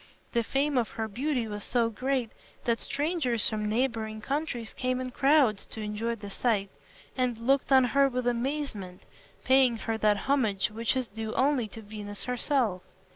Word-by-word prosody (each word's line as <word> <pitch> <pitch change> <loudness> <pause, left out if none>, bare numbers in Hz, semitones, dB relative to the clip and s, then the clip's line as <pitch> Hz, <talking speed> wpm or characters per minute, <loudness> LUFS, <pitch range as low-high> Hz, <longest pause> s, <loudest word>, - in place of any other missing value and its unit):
The 235 - +3
fame 275 +2 +1
of 230 - -1
her 220 -1 -3
beauty 250 +2 -1
was 210 -1 -5
so 235 -2 +1
great 255 0 -1 0.3
that 235 -2 +1
strangers 285 -6 +1
from 215 -1 -1
neighboring 220 -2 -1
countries 270 -2 -3
came 255 0 -1
in 255 0 -4
crowds 270 -6 +3
to - - -7
enjoy 215 +2 -2
the 205 -2 -9
sight, 200 -4 0 0.4
and 250 -3 0
looked 265 +5 +1
on 265 -1 +7
her 275 +3 +3
with 250 -1 -2
amazement, 240 -7 -2 0.4
paying 260 -3 +4
her 225 0 -3
that 210 -1 +3
homage 225 -9 +1
which 225 +3 0
is 255 -2 -1
due 220 +1 -5
only 265 -4 +2
to 220 +1 -10
Venus 205 -1 -6
herself. 250 -6 0
235 Hz, 170 wpm, -28 LUFS, 215-265 Hz, 0.4 s, on